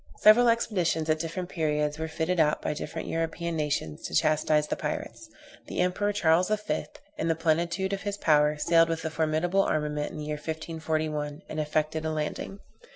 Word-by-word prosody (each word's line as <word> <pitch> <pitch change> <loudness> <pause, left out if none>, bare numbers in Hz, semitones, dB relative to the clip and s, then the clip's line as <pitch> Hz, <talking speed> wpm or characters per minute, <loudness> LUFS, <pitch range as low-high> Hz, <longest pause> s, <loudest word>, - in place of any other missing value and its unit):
Several 235 +3 +7
expeditions 180 -9 +1
at 155 - +1
different 170 +3 -4
periods 150 -2 -1
were 160 - -2
fitted 160 +3 -1
out 150 -1 +3
by - - -2
different 150 - -5
European 165 +1 -2
nations 145 - -2
to - - -5
chastise 155 - +3
the - - -2
pirates. - - -5 0.4
The - - -5
Emperor, 180 +3 +1
Charles 180 -2 +3
V., 210 0 -1 0.3
in - - 0
the 165 - +2
plenitude 170 +4 0
of 195 - -3
his 205 -1 -3
power, 150 -3 +3
sailed 165 +2 +4
with 165 0 -2
a 160 - -2
formidable 160 +4 +1
armament 150 -4 -1
in - - -8
the 150 - -5
year 150 0 -3
1541, 155 -1 -3
and 155 - -5
affected 155 +1 -1
a 160 - -1
landing. 155 +5 -3
160 Hz, 180 wpm, -28 LUFS, 150-175 Hz, 0.4 s, Several